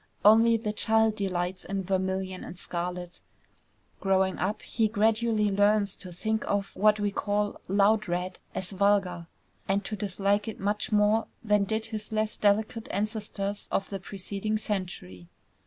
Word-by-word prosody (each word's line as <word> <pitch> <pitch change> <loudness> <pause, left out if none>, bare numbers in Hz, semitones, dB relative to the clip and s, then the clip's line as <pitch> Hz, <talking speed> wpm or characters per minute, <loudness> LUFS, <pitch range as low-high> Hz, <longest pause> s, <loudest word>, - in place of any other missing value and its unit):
Only 225 +2 +7
the 210 -1 -3
child 220 0 +3
delights 185 -2 -2
in 195 -1 -3
vermilion 190 0 -2
and 175 - -9
scarlet. 175 0 -5 0.8
Growing 190 -1 +1
up 200 +4 -1
he 225 -1 +1
gradually 220 0 +2
learns 205 0 +3
to 185 - -9
think 220 +5 -1
of 200 -1 -1
what 210 +1 +4
we 205 -1 0
call 205 0 -1
"loud 205 +2 +3
red" 180 +1 -3 0.2
as 185 - -2
vulgar, 195 -3 +1 0.4
and 195 +1 +1
to 215 - -3
dislike 200 +1 0
it 220 - -5
much 205 +4 -1
more 210 +1 +3 0.2
than 210 -2 +3
did 220 +2 -1
his 215 -1 -6
less 215 0 0
delicate 215 +2 +1
ancestors 205 -1 -3
of 195 - -1
the 195 - -3
preceding 200 +3 -3
century. 175 - -5
205 Hz, 150 wpm, -28 LUFS, 190-215 Hz, 0.8 s, Only